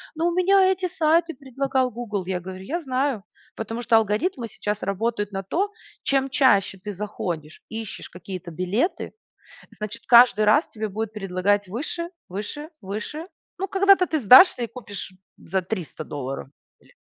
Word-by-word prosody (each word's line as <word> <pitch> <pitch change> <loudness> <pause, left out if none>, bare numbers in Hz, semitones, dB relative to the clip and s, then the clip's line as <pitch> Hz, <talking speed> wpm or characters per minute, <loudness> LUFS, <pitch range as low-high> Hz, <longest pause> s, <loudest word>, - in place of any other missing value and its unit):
"Ну, 330 +2 +1
у 345 - 0
меня 385 +2 +5
эти 370 -1 -1
сайты 330 0 +2
предлагал 265 -1 -1
Гугл". 215 -5 -4
Я 185 -1 -1
говорю: 185 +1 -8
"Я 320 - -2
знаю, 260 - -1 0.3
Потому 225 +2 -4
что 230 -1 +3
алгоритмы 225 - +1
сейчас 210 0 -4
работают 205 +1 -1
на 195 - -3
то, 365 - -1 0.3
чем 270 0 +1
чаще 255 -8 +3
ты 205 +3 -6
заходишь, 180 -6 -5
ищешь 220 -2 -7
какие-то 180 -1 -8
билеты, 185 - -1 0.6
значит, 215 +2 -6
каждый 235 -3 +7
раз 290 +10 +4
тебе 215 -1 -4
будет 215 +2 -4
предлагать 200 0 0
выше, 320 - -4 0.2
выше, 215 - -6
выше. 215 - -5 0.3
Ну, 390 - -1
когда-то 390 -1 +4
ты 315 - 0
сдашься 255 - +8
и - - -2
купишь, 205 -6 -8
м, 185 - -22 0.3
за 190 +2 0
300 180 -4 -5
долларов 135 -3 -5 0.3
билет". - - -24
220 Hz, 160 wpm, -24 LUFS, 195-290 Hz, 0.6 s, сдашься